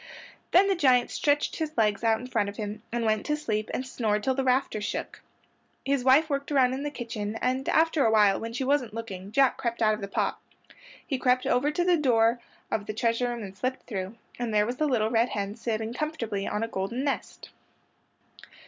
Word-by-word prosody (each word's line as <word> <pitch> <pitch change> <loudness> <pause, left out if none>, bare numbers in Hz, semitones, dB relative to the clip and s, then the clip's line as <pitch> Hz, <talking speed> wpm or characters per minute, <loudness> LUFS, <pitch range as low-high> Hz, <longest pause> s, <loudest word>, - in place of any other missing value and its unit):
Then 380 +3 +5
the 395 - +3
giant 260 -8 +3
stretched 290 0 +1
his 315 -3 -4
legs 210 -1 +2
out 225 -1 +3
in 250 - -8
front 210 -5 0
of 200 - -10
him 210 0 -5
and 235 0 -1
went 215 -1 +1
to 300 0 +1
sleep 215 -7 -2
and 255 - -3
snored 215 -5 -1
till 265 - +2
the 270 +1 -1
rafters 255 -4 +1
shook. 205 - -4 0.6
His 275 -2 +1
wife 270 +5 +5
worked 280 -1 -3
around 260 -3 +4
in 265 - -3
the 295 - -2
kitchen, 225 -6 -5
and 255 +1 -1
after 320 -2 +3
awhile, 210 -3 +4
when 230 0 -5
she 255 +4 -3
wasn't 260 -5 0
looking, 200 -4 -7
Jack 270 +3 +3
crept 235 -2 -3
out 215 -2 +3
of 215 - -5
the 200 - -4
pot. 200 - -1 0.7
He 270 -3 -2
crept 250 0 +2
over 265 +4 +2
to 325 +4 0
the 355 -1 +3
door 235 -4 +3 0.3
of 210 -2 -2
the 215 - -4
treasure 230 +2 +1
room 240 -2 -4
and 195 -1 -8
slipped 255 +7 -3
through, 195 -1 -5 0.2
and 240 -2 -2
there 210 -1 +3
was 245 +3 -3
the 305 - +1
little 225 -5 +1
red 235 +1 +3
hen 200 0 -3
sitting 225 -1 -3
comfortably 240 -9 -3
on 210 +2 -1
a - - -1
golden 225 +5 -3
nest. 280 -1 -4
235 Hz, 215 wpm, -27 LUFS, 215-270 Hz, 0.7 s, Then